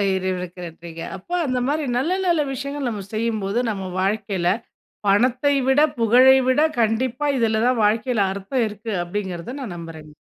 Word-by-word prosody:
இறைவனுக்கு 185 -1 -3
நன்றிங்க. 165 0 -9 0.2
அப்ப 190 - -19 0.2
அந்த 255 -2 0
மாரி 300 +2 0
நல்ல 275 +8 0 0.2
நல்ல 340 -3 +3
விஷயங்கள் 280 0 -4
நம்ம 210 -4 -5
செய்யும்போது, 220 -1 -1
நம்ம 195 -3 -4
வாழ்க்கையில 195 -2 -1 0.6
பணத்தை 255 +7 +3
விட, 265 +3 +4 0.2
புகழை 255 +4 +6
விட, 260 +3 +3 0.2
கண்டிப்பா 235 +5 0
இதுல 220 -2 +1
தான் 250 -3 +2
வாழ்க்கையில 220 0 +1
அர்த்தம் 200 +5 -1
இருக்கு. 215 +2 -7
அப்டிங்கறத 190 +5 -5
நான் 210 -9 -5
நம்புறேங்க. 160 -2 -10
220 Hz, 145 wpm, -22 LUFS, 190-255 Hz, 0.6 s, புகழை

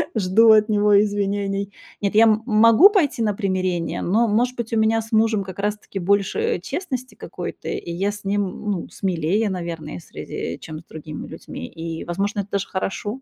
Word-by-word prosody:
жду 220 +2 +5
от 215 0 +6
него 205 -1 +4
извинений. 200 -1 -1 0.3
Нет, 200 0 -1
я, 220 - +7
м, 220 -1 +3
могу 230 - +7
пойти 340 - +1
на 210 - +1
примирение, 185 -4 -1
но, 225 +6 +2
может 245 +4 +1
быть, 230 -1 -4
у - - +2
меня 220 +1 +3
с 225 +1 -12
мужем 220 -2 +2
как 185 0 -9
раз-таки 205 -1 -3
больше, 200 +2 +1
э, - - 0
честности 260 - -5
какой-то, - - -7
и 170 - -4
я 195 +4 -1
с 205 -1 -10
ним, 200 +1 0
м, 205 +3 -4
ну, 185 -4 -4
смелее, 190 +3 0
наверное, 165 - -5
в - - -15
среде, 85 - -6
чем 155 -1 -8
с - - -16
другими 155 -1 -8
людьми, 85 - -8
и, 165 0 -6
возможно, 200 +4 -2
это 200 - -10
даже 195 -1 -1
хорошо. 205 +6 -4
205 Hz, 195 wpm, -22 LUFS, 185-220 Hz, 0.3 s, я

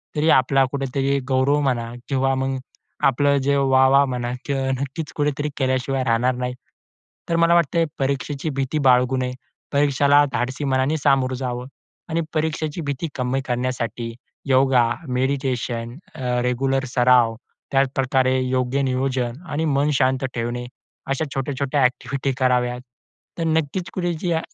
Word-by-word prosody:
तरी 155 +2 +2
आपला 135 -1 +4
कुठेतरी 135 0 0
गौरव 135 +2 +2
म्हणा 120 -4 -1 0.2
किंवा 135 -1 +1
मग 135 0 -1 0.5
आपलं 140 +2 +3
जे 140 +1 +2
वाह-वाह 135 0 +5
म्हणा 125 -2 -3
किंवा 135 -2 -1
नक्कीच 140 +3 -4
कुठेतरी 145 0 -1
केल्याशिवाय 130 0 0
राहणार 125 +1 +1
नाही. 125 0 -3 0.8
तर 170 - +1
मला 170 0 +4
वाटतंय 170 0 +2
परीक्षेची 140 +2 -2
भीती 135 +3 -1
बाळगू 125 +1 +4
नये. 125 0 -2 0.4
परीक्षेला 145 0 +4
धाडसी 130 +4 -2
मनाने 135 +3 +1
सामोरं 135 -3 +2
जावं. 125 -1 -4 0.4
आणि 165 +1 0
परीक्षेची 155 0 -2
भीती 145 +2 -3
कमी 130 +1 -1
करण्यासाठी 120 -2 -2 0.4
योगा, 130 -2 +4 0.2
मेडिटेशन, 125 -2 -2 0.2
अ, - - -8 0.2
रेग्युलर 135 +2 0
सराव. 125 -2 +4 0.4
त्याचप्रकारे 130 -1 +2
योग्य 130 +1 0
नियोजन 130 0 -1
आणि 155 +3 -1
मन 145 +2 +2
शांत 130 0 +2
ठेवणे, 120 +1 -3 0.4
अशा 135 +3 -1
छोट्या-छोट्या 135 +1 -1
ॲक्टिव्हिटी 130 +2 0
कराव्यात. 125 -1 +1 0.6
तर - - 0
नक्कीच 160 +4 -2
कुठे 175 -2 -1
135 Hz, 130 wpm, -22 LUFS, 125-140 Hz, 0.8 s, वाह-वाह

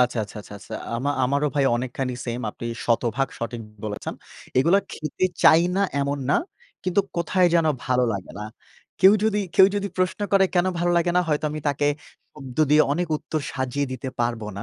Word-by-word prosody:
আচ্ছা, 125 -1 +2
আচ্ছা, 100 - -13
আচ্ছা, 105 - -13
আচ্ছা। 100 - -13 0.2
আমা 140 +4 -1
আমারও 140 +3 +1
ভাই 140 -2 +2
অনেকখানি 125 +1 -3
সেইম 120 0 -3
আপনি 120 - -8 0.2
শতভাগ 120 +3 +1
সঠিক 115 0 -4 0.2
বলেছেন। 105 -1 -4 0.4
এগুলো 165 +9 +4
খেতে 155 +4 -3 0.2
চাই 160 +1 +7
না - - +2 0.2
এমন 140 +1 -1
না। - - +4 0.5
কিন্তু 185 +2 +2 0.2
কোথায় 180 +1 +2
যেন 165 -2 +4 0.2
ভালো 125 -1 +2
লাগে 95 -2 -6
না। - - -5 0.6
কেউ 190 +2 +8
যদি 210 -1 +2 0.2
কেউ 190 - +8
যদি 200 0 -1
প্রশ্ন 185 +2 0
করে 195 -1 +6
কেন 180 +1 +3
ভালো 175 0 +1
লাগে 170 0 +2
না, - - +6
হয়তো 150 0 0
আমি 155 0 -5
তাকে 145 0 0 0.5
শব্দ 135 -4 -10
দিয়ে 150 +1 +7
অনেক 175 +4 0
উত্তর 155 +1 -4
সাজিয়ে 130 +2 -2
দিতে 130 +1 -5
পারব 120 -1 0 0.2
না 100 - -5
140 Hz, 190 wpm, -24 LUFS, 125-175 Hz, 0.6 s, কেউ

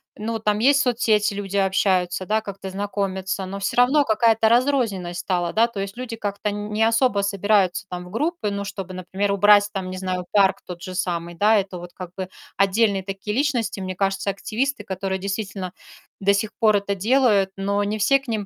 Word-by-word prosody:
ну, 225 +2 -3
там 210 -1 0
есть 280 +4 +5
соцсети, 220 -4 +2
люди 200 0 -4
общаются, 185 -1 +1
да, 215 +1 +1
как-то 195 -2 -7
знакомятся, 190 -1 -3
но 195 - -5
всё 200 - -2
равно 270 +4 +5
какая-то 225 0 +3
разрозненность 225 -8 +1
стала, 175 -2 -1
да, 225 +2 +4
то 235 -4 -6
есть 195 +3 -5
люди 245 -2 -5
как-то 205 0 -3
нь 205 +1 -5
не 215 +1 +1
особо 230 -2 +3
собираются 200 -2 +1
там 180 0 -6
в 180 - -12
группы, 260 - -1
ну, 200 0 -3
чтобы, 195 -2 -6
например, 190 +2 -2
убрать 205 +1 +5
там, 190 -2 -3
не 185 - -5
знаю, 185 -1 -3
парк 200 -1 +3
тот 175 -1 -8
же 185 - -6
самый, 175 -2 -2
да. 210 +5 +4
Это 190 -3 -2
вот 175 0 -10
как 180 -2 -8
бы 185 -1 -5 0.3
отдельные 200 0 +2
такие 195 +2 -5
личности, 245 -7 0
мне 185 -1 -4
кажется, 195 +1 -1
активисты, 240 +8 -2
которые, 190 0 -3
действительно, 195 -1 -4 0.5
до 200 +1 +3
сих 210 +1 -2
пор 215 -3 +4
это 200 0 0
делают, 210 -1 +3
но 200 +1 0
не 210 +1 -2
все 275 +7 +4
к 270 - -20
ним 215 -3 -2
200 Hz, 200 wpm, -23 LUFS, 190-220 Hz, 0.5 s, есть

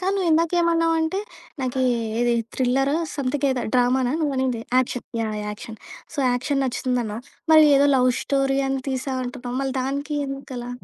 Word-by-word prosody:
కానీ 380 +2 0
నువ్విందాకేమన్నావంటే, 330 0 +2 0.4
నాకీ 260 0 -1 0.4
ఇది 240 0 +2 0.2
థ్రిల్లరో, 270 +2 +1 0.2
స‌మ్‌థింగ్ 280 0 -1
ఏదో, 255 -2 -1
డ్రామనా 250 +1 +2
నువ్వనింది? 260 -5 0 0.2
Action. 250 -1 -1 0.2
Yeah! 215 -1 -2
Action. 215 +1 -8 0.4
So - - -10
action 275 +3 0
నచ్చుతుందన్నావు. 245 -3 -2 0.3
మరి 310 -1 +8
ఏదో 280 +1 +5
లవ్ 255 0 +4
స్టోరీ 275 -1 +1
అని 270 0 -1
తీసావు 260 0 -2
అంటున్నావు. 245 0 -5
మళ్ళ 270 -1 -1
దానికి 280 +3 -3
ఎందుకలా? 265 -3 -6
265 Hz, 140 wpm, -23 LUFS, 250-285 Hz, 0.4 s, మరి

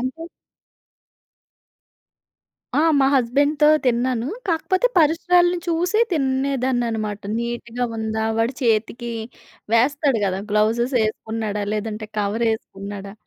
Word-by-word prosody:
అంటే 260 +6 -4 2.5
ఆ! - - +2 0.2
మా 270 - +4
హస్బెండ్‌తో 285 +4 +2 0.2
తిన్నాను, 245 0 +1 0.2
కాకపోతే 370 +6 +1
పరిసరాలిని 350 +3 +3
చూసి 350 +5 +1
తినేదాన్ననమాట. 260 - -1 0.2
నీట్‌గా 235 +1 -3
ఉందా? 220 0 -2
వాడు 230 +3 +1
చేతికి 235 +1 0 0.6
వేస్తాడు 275 +2 +3
గదా! 190 0 -1
గ్లౌజెస్ 230 +5 +1
ఎసుకున్నాడా? 215 -1 -3
లేదంటే 215 0 -4
కవరేసుకున్నాడా? 205 -2 -3
240 Hz, 85 wpm, -22 LUFS, 220-280 Hz, 2.5 s, మా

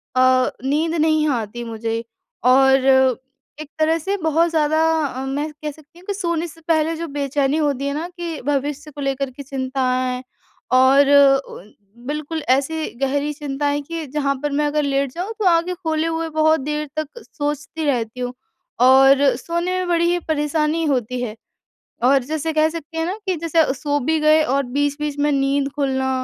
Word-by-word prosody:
अ, 255 0 +4
नींद 310 +5 0
नहीं 310 -1 +2
आती 240 -2 -3
मुझे। 230 0 -3 0.4
और 265 +1 +6 0.8
एक 305 - -9
तरह 320 +1 +3
से 390 +5 -2
बहुत 320 +2 +2
ज़्यादा 315 -1 +2 0.2
अ, 265 -1 -4
मैं 290 +3 -3
कह 300 0 -6
सकती 310 +3 -19
हूँ 360 - -18
कि 405 - -1
सोने 340 -4 -2
से 330 0 -14
पहले 325 0 +2
जो 335 +1 -5
बेचैनी 280 +1 0
होती 280 -3 0
है 280 - -1
ना 320 +4 -3
कि 335 -3 -5
भविष्य 290 +1 -2
को 290 0 -9
लेकर 275 0 -1
के 280 +3 -9
चिंताएँ 255 -1 -2 0.5
और 270 +2 +5 0.4
उन 205 +4 -12 0.3
बिल्कुल 305 +2 -3
ऐसी 280 +5 +1 0.2
गहरी 285 +2 0
चिंताएँ 290 0 -2
कि 330 +2 -6
जहाँ 280 -2 0
पर 295 - -1
मैं 295 +1 +1
अगर 300 0 0
लेट 275 -1 0
जाऊँ 365 - -5
तो 420 - -1
आँखें 340 +1 +2
खोले 320 -2 -1
हुए 325 0 -2
बहुत 315 0 +3
देर 300 +2 -3
तक 310 -2 -2
सोचती 295 +2 -4
रहती 245 -3 -1
हूँ। 250 0 -3 0.5
और 270 +2 +7 0.2
सोने 340 +6 -2
में 370 -1 -2
बड़ी 340 -1 +2
ही 350 - +1
परेशानी 310 +1 0
होती 250 -3 -1
है। 225 -3 -4 0.7
और 270 0 +4
जैसे 315 +3 -2
कह 310 0 +3
सकते 325 0 -7
हैं 325 - 0
ना? 365 - -2
कि 370 - 0
जैसे 325 -3 +1
सो 290 +2 -1
भी 315 +5 +1
गए 310 +1 +5
और 280 -2 +1
बीच-बीच 290 +3 -2
में 295 +1 +2
नींद 275 0 +1
खुलना 265 -2 0
295 Hz, 180 wpm, -20 LUFS, 270-320 Hz, 0.8 s, और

